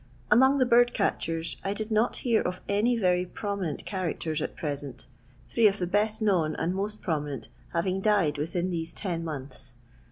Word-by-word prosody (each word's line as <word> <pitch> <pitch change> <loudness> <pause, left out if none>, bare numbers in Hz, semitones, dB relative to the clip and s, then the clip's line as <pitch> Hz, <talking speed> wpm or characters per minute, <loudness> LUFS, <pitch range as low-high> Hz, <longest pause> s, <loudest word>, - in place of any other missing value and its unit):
Among 265 +5 +6
the 260 - +4
bird 240 0 +4
catchers 165 0 -1
I 195 +1 -1
did 215 +1 -4
not 220 +3 +2
hear 235 -3 +1
of 180 0 -3
any 220 +4 +2
very 180 -4 +2
prominent 190 -4 -4
characters 170 -5 -2
at - - -4
present, 145 -3 -5 0.4
three 230 -2 +4
of 200 0 +1
the 180 - -1
best 210 +4 +1
known 170 -7 +2
and 170 +2 -1
most 205 +3 -3
prominent 150 -5 -2 0.2
having 185 +3 0
died 190 -9 +2
within 170 +4 -1
these 165 -1 -3
ten 175 -5 -3
months. 135 -5 -7
185 Hz, 170 wpm, -28 LUFS, 160-215 Hz, 0.4 s, Among